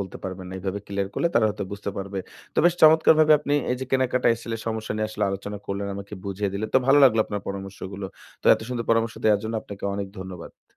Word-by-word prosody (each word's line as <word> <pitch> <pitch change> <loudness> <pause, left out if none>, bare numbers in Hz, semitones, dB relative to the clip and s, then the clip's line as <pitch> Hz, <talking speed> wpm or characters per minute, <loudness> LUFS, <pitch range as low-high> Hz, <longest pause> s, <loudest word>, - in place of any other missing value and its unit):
বলতে 95 - -6
পারবেন 95 -1 -6
না। - - -8
এভাবে 95 +1 -3
ক্লিয়ার 100 -1 -2
করলে 170 - +1
তারা 115 - +4
হয়তো 105 -1 -3
বুঝতে 100 0 -4
পারবে। 100 0 -4 0.4
তো - - -1
বেশ 175 0 +5
চমৎকারভাবে 155 0 +7
আপনি 145 0 -3 0.2
এই 125 - +1
যে 130 - -2
কেনাকাটা 130 -2 +2
এসেলে 115 0 -5
সমস্যা 110 -1 -2
নিয়ে 110 - 0
আসলে 105 -1 -1
আলোচনা 100 +1 -5
করলেন 100 0 -3
আমাকে 100 +1 -9
বুঝিয়ে 100 0 -2
দিলেন। 110 +2 -2
তো - - +8
ভালো 140 +2 +6
লাগলো 115 -4 +5
আপনার 105 -1 -4
পরামর্শগুলো। 95 0 -6 0.4
তো - - -5
এত - - -8
সুন্দর 120 -2 -3
পরামর্শ 115 0 +2
দেওয়ার 105 -2 +4
জন্য 110 - -3
আপনাকে 100 -1 -9
অনেক 100 0 -3
ধন্যবাদ। 95 -2 -10
105 Hz, 225 wpm, -25 LUFS, 100-120 Hz, 0.4 s, তো